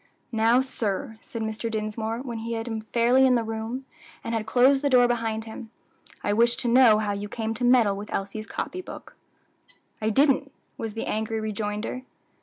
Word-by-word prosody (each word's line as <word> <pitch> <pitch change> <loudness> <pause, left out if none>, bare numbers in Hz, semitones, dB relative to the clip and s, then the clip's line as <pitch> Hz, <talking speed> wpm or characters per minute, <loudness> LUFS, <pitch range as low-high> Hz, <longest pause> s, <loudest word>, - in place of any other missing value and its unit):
"Now, 230 +2 +4
sir," 225 -2 -3
said 230 -2 -6
Mr. 220 +1 -3
Dinsmore, 220 +1 -3
when 235 -4 -5
he 230 +1 -4
had 225 +1 -3
him 225 -2 -3
fairly 240 +4 +3
in 255 - +4
the 235 - +1
room, 225 +4 -4 0.4
and 230 - -3
had 220 -1 -2
closed 265 +2 +4
the 285 - +1
door 250 -2 +6
behind 225 -2 -1
them, 225 +1 -9 0.5
"I 205 - +1
wish 235 +2 +3
to - - -2
know 235 -2 +6
how 215 -1 -1
you 205 +1 -4
came 225 0 -3
to 230 +2 -5
meddle 240 -5 +4
with 205 +2 -8
Elsie's 200 +3 -4
copy 370 - -4
book." - - -11 0.9
"I 215 - +1
didn't," 275 +3 +3 0.2
was 225 -1 -5
the 225 - -3
angry 220 +1 -2
rejoinder. 215 +2 -3
225 Hz, 190 wpm, -26 LUFS, 220-245 Hz, 0.9 s, door